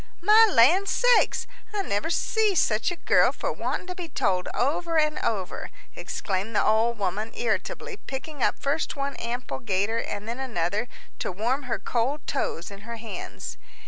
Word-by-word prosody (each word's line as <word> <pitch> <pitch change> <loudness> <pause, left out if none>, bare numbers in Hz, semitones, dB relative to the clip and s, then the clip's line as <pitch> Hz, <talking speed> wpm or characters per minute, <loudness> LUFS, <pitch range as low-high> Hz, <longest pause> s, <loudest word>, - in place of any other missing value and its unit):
"My 430 +4 +7
land 340 +12 +5
sakes! - - +3 0.3
I 400 - 0
never 205 - -1
see 425 +4 +2
such 220 -8 +2
a 350 - -3
girl - - +4
for - - -3
wanting - - -3
to 365 - -5
be 355 -2 -7
told 185 -8 0
over 325 +6 0
and 305 -1 +2
over," 195 -5 -2 0.3
exclaimed 200 +2 -3
the - - +3
old 225 +2 +3
woman, 205 +3 -2
irritably, 400 - -2
picking 285 -2 -7
up - - +2
first 285 +4 -1
one 280 0 -2
ample 240 +2 -4
gaiter 205 +1 0
and 205 -1 -4
then 235 +3 -4
another 215 -3 -1 0.3
to - - -2
warm 250 +8 -1
her - - +1
cold 260 +5 -1
toes 190 -10 -2
in 200 - -9
her 235 +3 -7
hands. 225 0 -7
240 Hz, 170 wpm, -26 LUFS, 215-320 Hz, 0.3 s, My